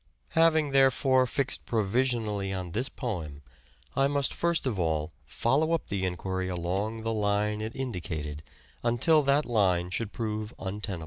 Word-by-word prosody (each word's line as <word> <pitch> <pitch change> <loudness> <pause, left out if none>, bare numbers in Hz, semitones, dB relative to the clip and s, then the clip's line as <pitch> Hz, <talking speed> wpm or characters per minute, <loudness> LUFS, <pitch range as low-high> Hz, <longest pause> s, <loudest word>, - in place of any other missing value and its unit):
Having, 160 -3 +3
therefore, 135 -1 +4
fixed 135 +1 -1
provisionally 110 -2 0
on 90 -2 -4
this 125 - -1
poem 80 - -5 0.5
I 135 0 +4
must 140 -1 0
first 170 -2 +1
of 115 -7 -1
all 80 -3 0
follow 150 +7 +1
up 165 - -1
the 95 -1 -1
enquiry 95 +1 -2
along 95 +6 -2
the 115 0 -1
line 105 0 0
it 110 +1 -5
in 130 -3 -3
dicated 80 -4 -4 0.4
until 120 +7 +4
that 140 +1 +2
line 90 -6 +2
should 110 +1 -2
prove 110 -1 -4
untenable. 100 -1 -4
110 Hz, 150 wpm, -28 LUFS, 95-130 Hz, 0.5 s, therefore